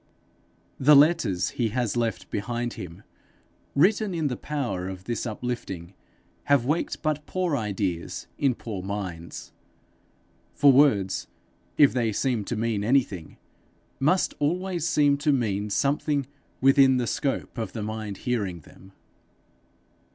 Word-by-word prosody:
The 145 +3 +7
letters 140 - +4
he 115 -3 -1
has 120 0 -1
left 115 -2 -2
behind 120 +3 -2
him, 85 -2 -9 0.7
written 195 +5 +3
in 155 -3 0
the 125 - -2
power 120 -11 -3
of 95 -1 -8
this 120 +3 -3
uplifting, 105 -6 -5 0.5
have 140 -4 +3
waked 155 +6 -1
but 150 -1 -1
poor 180 -5 0
ideas 100 -7 -3
in 135 -4 +2
poor 105 -6 -6
minds; 95 -4 -6 1.0
for 145 - +6
words, 120 -9 +3 0.5
if 145 -2 +6
they 120 -3 +1
seem 120 0 0
to 120 - -3
mean 110 -2 -1
anything, 110 - 0 0.6
must 165 +7 +2
always 175 +2 -1
seem 145 -1 +3
to 145 +1 +2
mean 105 -6 0
something 140 +4 0 0.4
within 135 -1 +6
the 125 - 0
scope 135 0 -2
of 110 - -4
the 110 - -4
mind 110 -2 -5
hearing 100 -9 -1
them. 95 +6 -17
120 Hz, 130 wpm, -26 LUFS, 100-145 Hz, 1.0 s, The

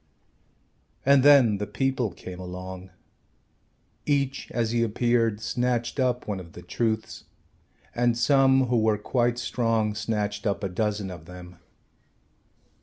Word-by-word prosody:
And 140 0 +6
then 130 -7 +6
the 105 - -3
people 125 +2 -1
came 90 0 -10
along. 90 +1 -8 1.2
Each 140 -2 0
as 115 -2 -1
he 120 0 +1
appeared 115 -1 +1
snatched 120 +2 -1
up 125 -1 0
one 100 -3 -3
of 85 -3 -12
the 90 - -11
truths 110 +4 -3 0.7
and 120 -1 +1
some 135 0 +4
who 125 -1 +1
were 110 -1 +2
quite 120 +3 0
strong 115 -3 0
snatched 105 -1 -2
up 100 +1 -2
a 100 - -1
dozen 105 +1 -2
of 85 -3 -10
them. 90 0 -12
110 Hz, 130 wpm, -26 LUFS, 100-125 Hz, 1.2 s, And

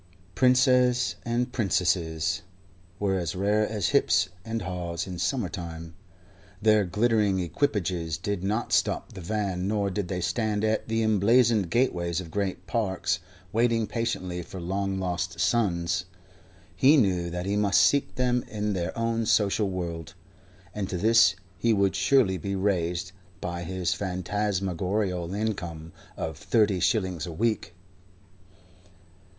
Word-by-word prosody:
Princes 125 +1 +4
and 120 +1 -1
princesses 90 -7 0 0.6
were 95 -2 +1
as 85 +1 -3
rare 105 +3 +2
as 105 -4 -1
hips - - +3
and 115 0 -3
haws 90 -2 -4
in 90 -2 -6
summer 100 +5 0
time. 85 -3 -7 0.7
Their 110 -1 +4
glittering 105 0 +2
equipages 90 - -1
did 100 -3 -3
not 110 +4 -1
stop - - +1
the 95 - -8
van, 95 -1 -2
nor 100 -1 0
did 95 -1 -2
they 90 -1 -3
stand 105 +3 -1
at 110 0 0
the 115 0 0
emblazoned 110 -1 +3
gateways 85 -7 +1
of 85 -3 -8
great 95 -2 -2
parks 95 -2 -1 0.3
waiting 115 0 +2
patiently 100 -7 -3
for 90 +2 -9
long 95 +2 -2
lost 90 -2 -3
sons. 90 -4 +1 0.7
He 135 - +6
knew 90 -8 +2
that 90 +1 -4
he 100 +1 0
must 100 -1 +3
seek 140 -1 +2
them 125 -1 +1
in 105 -1 -2
their 90 +1 -3
own 115 -1 0
social 105 -1 +2
world, 85 -1 -5 0.6
and 100 -3 -3
to 90 - -2
this 110 0 +5 0.2
he 115 +5 +3
would 100 -2 +2
surely 95 -1 +3
be 100 -1 -3
raised 90 -2 -1 0.3
by 85 0 -4
his 90 0 -1
phantasmagorial 95 -1 -2
income 85 -7 -4 0.2
of 80 -1 -4
thirty 105 -3 +2
shillings 95 -3 0
a - - -5
week. 110 0 -1
95 Hz, 135 wpm, -27 LUFS, 90-110 Hz, 0.7 s, He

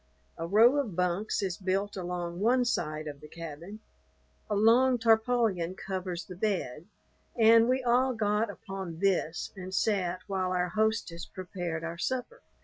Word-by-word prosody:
A 165 - -5
row 230 +9 +5
of 240 -11 -2
bunks 180 +4 0
is 185 -3 -2
built 195 +2 -1
along 175 -2 -4
one 245 +4 +3
side 155 -9 -2
of 145 -1 -8
the 150 - -11
cabin. 165 +6 -9 0.7
A 210 - 0
long 240 +5 +5
tarpaulin 225 -6 +2
covers 185 -2 -4
the 185 - -9
bed, 175 - -2 0.5
and 230 +1 +6
we 260 0 +1
all 250 +1 +2
got 210 0 +1
upon 195 -4 -7
this 180 -3 0
and 185 -1 -7
sat 185 -3 0
while 185 -2 -1
our 180 0 0
hostess 215 -4 -1
prepared 175 -3 -5
our 165 0 -5
supper. 260 - -3
195 Hz, 150 wpm, -29 LUFS, 175-225 Hz, 0.7 s, and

